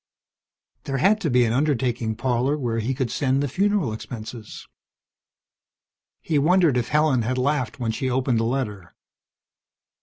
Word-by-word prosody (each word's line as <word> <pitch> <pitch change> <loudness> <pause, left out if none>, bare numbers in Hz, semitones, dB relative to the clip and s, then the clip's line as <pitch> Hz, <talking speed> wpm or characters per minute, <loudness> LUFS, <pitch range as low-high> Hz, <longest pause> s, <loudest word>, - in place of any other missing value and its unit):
There 135 -1 -2
had 210 +10 +3
to 160 - 0
be 125 -1 +4
an 115 - 0
undertaking 125 -5 0
parlor 130 +4 0
where 120 -5 -2
he 125 +4 -2
could 125 -3 -2
send 135 0 0
the - - 0
funeral 190 - 0
expenses. 110 0 -8 1.5
He 155 -3 0
wondered 170 -1 +3
if 120 -1 0
Helen 150 -4 +2
had 125 +3 -2
laughed 130 -3 -1
when 115 -2 -1
she 130 +4 -2
opened 125 -2 +1
the - - 0
letter. 105 -8 -3
130 Hz, 150 wpm, -23 LUFS, 115-145 Hz, 1.5 s, be